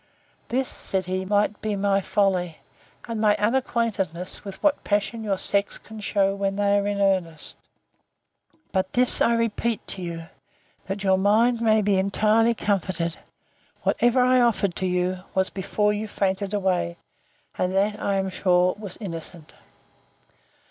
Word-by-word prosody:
This, 260 +2 0
said 190 -2 -3
he, 185 +1 -2
might 205 +1 +1
be 215 -1 -1
my 200 0 +1
folly, 185 -4 0 0.5
and 230 -2 -3
my 210 -1 +4
unacquaintedness 210 - -1
with 195 -2 -7
what 300 -1 +2
passion 205 +2 -1
your 200 -3 0
sex 200 +1 +1
can 220 0 -11
shew 200 -1 +1
when 195 0 -1
they 200 0 +2
are 200 - -2
in 205 -1 -1
earnest. 185 -5 -1 1.1
But 190 -1 -1
this 250 0 +4
I 235 - +4
repeat 230 -1 -1
to 190 - -6
you, 170 -2 -5 0.6
that 195 +1 -4
your 190 -1 +3
mind 225 +4 +3
may 220 -2 +3
be 200 -1 +2
entirely 215 +4 +2
comforted—Whatever 195 +6 -2
I 255 0 +4
offered 210 -6 +1
to 185 - -1
you, 180 0 0 0.2
was 190 0 +1
before 210 +2 0
you 210 +1 -3
fainted 195 -1 -1
away, 185 - 0 0.6
and 180 - 0
that, 205 +2 +1
I 200 - 0
am 190 -1 -1
sure, 180 -1 +2
was 200 -4 -8
innocent. 165 -5 -8
200 Hz, 150 wpm, -24 LUFS, 185-215 Hz, 1.1 s, my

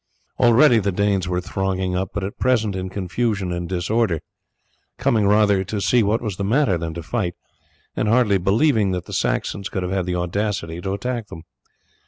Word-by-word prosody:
Already 120 +1 +6
the 100 -1 0
Danes 100 -1 0
were 90 0 -1
thronging 95 0 -2
up, 95 0 -1
but 105 - -4
at 100 - -6
present 110 -6 +1
in 95 0 -4
confusion 100 0 -2
and 85 0 -4
disorder, 95 0 0 0.8
coming 115 -6 +2
rather 105 -2 +4
to 105 +2 -3
see 120 +4 +3
what 110 +3 +1
was 105 -5 -3
the 100 - -2
matter 110 0 +2
than 85 -1 -4
to 85 - -6
fight, 90 -2 -2 0.6
and 105 - 0
hardly 105 -3 +3
believing 105 - +2
that 90 -1 -3
the - - -9
Saxons 100 -1 -1
could 95 - -3
have 90 - -3
had 95 -2 -1
the 90 - -1
audacity 90 -1 -2
to 95 +1 -3
attack 120 +1 -3
them. 80 -5 -10
100 Hz, 190 wpm, -21 LUFS, 90-110 Hz, 0.8 s, Already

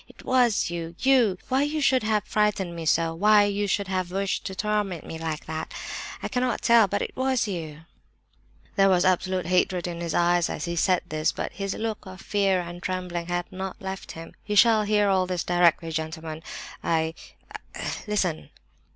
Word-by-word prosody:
It - - -16
was 245 -8 +2
you, 170 -1 -5
you! 250 -8 +3
Why 260 +1 +2
you 295 +2 0
should 265 -3 +3
have 215 -1 +1
frightened 210 -5 0
me 165 -1 -5
so, 165 +1 +2
why 210 +4 +5
you 205 0 0
should 200 0 0
have 185 -2 -1
wished 195 +1 -1
to 190 - -6
torment 210 -5 -1
me 160 - -7
like 160 -2 -4
that, 160 0 -5 0.5
I - - -1
cannot 250 -3 -1
tell—but 220 -4 +4
you - - 0
it - - -22
was." 260 -2 +1
There 170 +3 -4
was 180 -2 +3
absolute 185 0 +1
hatred 180 0 +1
in 170 -1 -4
his 170 -2 -2
eyes 175 0 +3
as - - -4
he 170 0 -3
said 180 +1 +2
this, 155 0 +1
but - - -4
his 195 -1 -3
look 220 -3 -4
of 185 0 -10
fear 195 -3 +1
and 175 0 -7
his - - -13
trembling 180 -2 -3
had 175 0 -2
not 190 0 -5
left 190 0 -6
him. 165 0 -10
"You 210 - -3
shall 225 0 +6
hear 210 0 +3
all 190 -2 +2
this 180 -2 -2
directly, 170 -2 +2
gentlemen. 160 0 -4 0.4
I—I—listen!" 165 +3 -3
185 Hz, 185 wpm, -26 LUFS, 170-210 Hz, 0.5 s, shall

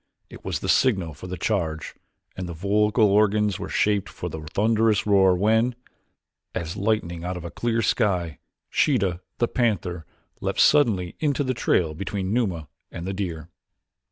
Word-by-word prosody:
It - - -12
was - - -3
the - - -4
signal 95 -11 +2
for 75 +6 -10
the 90 0 -5
charge 80 -5 -2 0.4
and 90 -1 -5
the 85 - -6
vocal 105 +4 +2
organs 105 -1 +2
were - - -5
shaped 105 -2 +1
for - - -6
the 80 - -6
thunderous 110 +6 +1
roar 95 -3 +5
when, 110 +6 +2 0.8
as 80 +1 -3
lightning 95 -5 -1
out 90 +1 -3
of 85 - -8
a 85 - -6
clear 115 -1 -1
sky, 90 - 0 0.3
Sheeta, 90 -2 +1 0.2
the 120 - +2
panther, 90 -10 -1 0.3
leaped - - -2
suddenly 105 -12 +3
into 145 -2 +1
the 130 -1 -1
trail 85 -8 +1
between 100 +3 -3
Numa 95 -10 -1 0.2
and 85 - -6
the 95 - -3
deer. 85 -5 -4
100 Hz, 160 wpm, -24 LUFS, 85-110 Hz, 0.8 s, roar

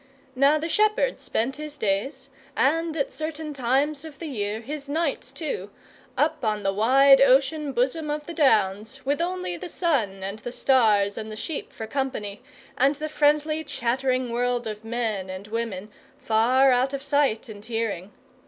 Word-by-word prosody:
Now 280 +4 +4
the 315 +2 -3
shepherd 430 +6 +2
spent 265 +5 -2
his 300 -1 -7
days 265 +6 -2 0.3
and 325 +3 +1
at 280 - -1
certain 310 -1 -5
times 275 +3 0
of 310 -3 -10
the 335 - -7
year 215 -7 -3
his 280 +4 -7
nights 290 -4 -1
too 275 - -4 0.5
up - - +1
on 210 -2 0
the 195 0 +1
wide 270 +6 +6
ocean 275 +3 +3
bosom 265 +5 0
of 295 0 -3
the 340 - -7
Downs, 220 - +1
with 285 +4 0
only 350 - -2
the - - -7
sun 230 - 0
and 200 +3 -4
the 245 - -6
stars 215 -7 +3
and 220 0 -6
the - - -6
sheep 295 +7 -5
for 220 - -6
company, 220 -5 -3 0.4
and 275 +3 +4
the 305 +2 -5
friendly 300 +1 +2
chattering 255 -1 -1
world 245 0 0
of 215 0 -6
men 225 -5 -2
and 185 +1 -6
women 215 -3 -4 0.3
far 250 +5 +3
out 255 +2 +2
of 275 -1 -4
sight 280 -6 +1
and 205 -2 -10
hearing. 220 -5 -3
260 Hz, 170 wpm, -25 LUFS, 220-295 Hz, 0.5 s, wide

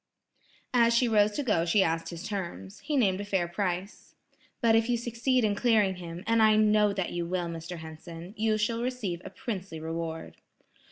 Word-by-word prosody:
As 235 -1 +4
she 245 +1 +4
rose 210 -2 +4
to 290 - -2
go 210 -10 +2
she 185 +4 +3
asked 165 -1 -1
his 170 0 -6
terms. 170 - -5
He 295 - -2
named 200 -6 +2
a - - -4
fair 190 -4 0
price. 185 +1 -4 0.4
"But 230 -2 +4
if 225 +1 +2
you 240 - +2
succeed 240 +2 0
in 210 -2 +2
clearing 210 -4 +2
him, 175 0 -7
and 230 0 +3
I 215 -1 +6
know 210 -1 +4
that 190 -3 -2
you 175 -1 -3
will, 180 0 -1
Mr. 170 +1 -6
Henson, 165 +3 -9
you 215 0 +1
shall 230 +2 0
receive 235 -9 -3
a - - -7
princely 190 -7 -6
reward." 165 0 -5
200 Hz, 190 wpm, -28 LUFS, 170-225 Hz, 0.4 s, I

